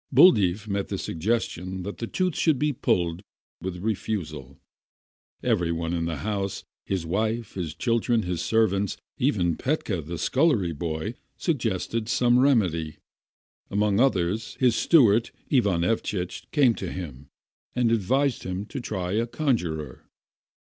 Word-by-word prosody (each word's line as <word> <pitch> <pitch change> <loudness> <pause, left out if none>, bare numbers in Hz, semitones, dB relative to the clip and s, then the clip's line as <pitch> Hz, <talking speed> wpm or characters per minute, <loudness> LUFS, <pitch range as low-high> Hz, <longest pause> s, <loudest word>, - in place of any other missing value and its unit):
Buldeeff 105 - +5
met 100 -1 -1
the 100 - -3
suggestion 95 -1 -2
that 100 +2 -6
the 115 - -3
tooth 185 +3 -1
should 160 -5 +2
be 150 +2 +1
pulled 85 -7 0 0.4
with 90 -1 -4
refusal. 90 - -3 0.9
Every 95 -9 +1
one 85 0 -2
in 85 -1 -1
the 85 -1 -2
house, 100 -2 -2 0.2
his 95 -4 -1
wife, 110 +5 -1
his 85 -4 -4
children, 115 +1 +1
the 90 -2 -2
servants, 100 0 +1 0.2
even 90 - +1
Petka, 125 - -1
the 85 +3 -6
scullery 120 - +2
boy, 80 +6 -3 0.2
suggested 115 - -1
some 125 -1 +4
remedy. 90 - +2 0.7
Among 105 0 +1
others 105 -4 +1
his 125 -3 +4
steward, 120 - +5 0.2
Ivan 100 -10 +3
Evceitch 90 -3 -2
came 135 -6 +4
to 95 -5 -5
him, 70 -7 -7 0.5
and 120 -2 +2
advised 125 +5 +1
him 95 +2 -4
to 135 - -5
try 95 -6 -3
a 115 +4 +1
conjuror. 90 - -2
100 Hz, 135 wpm, -26 LUFS, 85-120 Hz, 0.9 s, Buldeeff